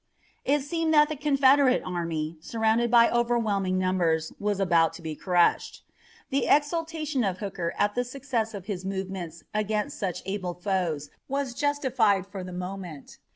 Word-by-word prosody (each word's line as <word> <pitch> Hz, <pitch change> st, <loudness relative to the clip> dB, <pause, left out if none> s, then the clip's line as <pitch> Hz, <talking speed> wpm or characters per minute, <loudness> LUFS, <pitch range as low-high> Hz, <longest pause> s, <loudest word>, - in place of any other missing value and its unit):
It 290 Hz, +2 st, +2 dB
seemed 325 Hz, +1 st, 0 dB
that 300 Hz, 0 st, +6 dB
the 310 Hz, -, -2 dB
Confederate 275 Hz, -2 st, +4 dB
army, 165 Hz, -3 st, -3 dB
surrounded 225 Hz, +4 st, +1 dB
by 235 Hz, 0 st, +6 dB
overwhelming 220 Hz, -6 st, +1 dB
numbers, 175 Hz, -4 st, +1 dB
was 205 Hz, -1 st, -1 dB
about 170 Hz, -4 st, +3 dB
to -, -, -10 dB
be 160 Hz, -1 st, -4 dB
crushed. 175 Hz, +1 st, +1 dB, 0.5 s
The 275 Hz, -, +1 dB
exultation 305 Hz, -2 st, +1 dB
of 190 Hz, -3 st, -1 dB
Hooker 180 Hz, -4 st, -4 dB
at 205 Hz, 0 st, +2 dB
the 245 Hz, -, 0 dB
success 245 Hz, -4 st, -3 dB
of 195 Hz, -3 st, -7 dB
his 195 Hz, -4 st, -4 dB
movements 190 Hz, -3 st, -5 dB
against 210 Hz, 0 st, -1 dB
such 185 Hz, -4 st, -3 dB
able 185 Hz, -2 st, -3 dB
foes 175 Hz, -6 st, -2 dB, 0.2 s
was 275 Hz, -2 st, -2 dB
justified 255 Hz, -9 st, +1 dB
for 195 Hz, -1 st, -7 dB
the 180 Hz, -, -7 dB
moment. 180 Hz, -4 st, -7 dB
205 Hz, 155 wpm, -27 LUFS, 180-260 Hz, 0.5 s, that